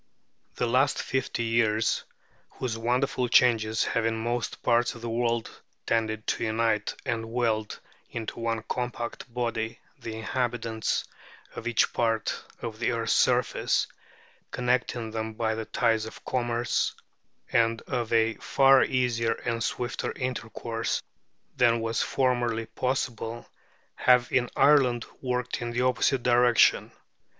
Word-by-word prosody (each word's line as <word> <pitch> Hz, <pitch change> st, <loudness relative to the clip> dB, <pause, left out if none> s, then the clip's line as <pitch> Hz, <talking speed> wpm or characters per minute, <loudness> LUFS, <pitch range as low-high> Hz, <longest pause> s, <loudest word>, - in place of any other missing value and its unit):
The -, -, 0 dB
last 130 Hz, +4 st, +2 dB
fifty 130 Hz, -2 st, -2 dB
years, 115 Hz, -1 st, +1 dB, 0.5 s
whose 125 Hz, -3 st, -3 dB
wonderful 125 Hz, +2 st, 0 dB
changes 110 Hz, -3 st, +4 dB
have 115 Hz, -, 0 dB
in 115 Hz, 0 st, 0 dB
most 120 Hz, +1 st, -3 dB
parts 120 Hz, +1 st, +2 dB
of 115 Hz, -, -11 dB
the 120 Hz, -, -4 dB
world 115 Hz, -1 st, 0 dB, 0.4 s
tended 110 Hz, -1 st, 0 dB
to -, -, -1 dB
unite 110 Hz, -2 st, 0 dB
and 115 Hz, -1 st, -2 dB
weld 115 Hz, -3 st, -1 dB, 0.3 s
into 115 Hz, 0 st, -5 dB
one 115 Hz, -1 st, -1 dB
compact 120 Hz, +1 st, -4 dB
body 115 Hz, -2 st, -2 dB, 0.2 s
the 110 Hz, -1 st, -6 dB
inhabitants 115 Hz, -1 st, -1 dB, 0.5 s
of 115 Hz, -, -5 dB
each 120 Hz, -, +2 dB
part 115 Hz, -2 st, +1 dB, 0.3 s
of 110 Hz, -1 st, -5 dB
the 120 Hz, -, +1 dB
earth's 115 Hz, -1 st, 0 dB
surface, -, -, +2 dB, 0.6 s
connecting 125 Hz, -2 st, -1 dB
them 110 Hz, 0 st, -3 dB
by 110 Hz, 0 st, -1 dB
the 110 Hz, 0 st, -4 dB
ties 115 Hz, -2 st, +1 dB
of -, -, -12 dB
commerce, 120 Hz, -2 st, 0 dB, 0.6 s
and 115 Hz, 0 st, +2 dB
of 120 Hz, -3 st, -3 dB
a 115 Hz, -1 st, +3 dB
far 135 Hz, 0 st, +5 dB
easier 120 Hz, -3 st, +1 dB
and 115 Hz, -1 st, -1 dB
swifter 120 Hz, 0 st, -2 dB
intercourse 115 Hz, -2 st, -3 dB, 0.5 s
than 120 Hz, -2 st, +4 dB
was 115 Hz, 0 st, -1 dB
formerly 120 Hz, -3 st, 0 dB
possible, 120 Hz, -1 st, -3 dB, 0.5 s
have 125 Hz, -1 st, +4 dB
in 125 Hz, -1 st, +2 dB
Ireland 135 Hz, -5 st, +4 dB, 0.2 s
worked 125 Hz, -1 st, -2 dB
in 120 Hz, -, -3 dB
the 120 Hz, +1 st, -1 dB
opposite 130 Hz, 0 st, +2 dB
direction. 120 Hz, -1 st, +4 dB
115 Hz, 130 wpm, -27 LUFS, 115-125 Hz, 0.6 s, far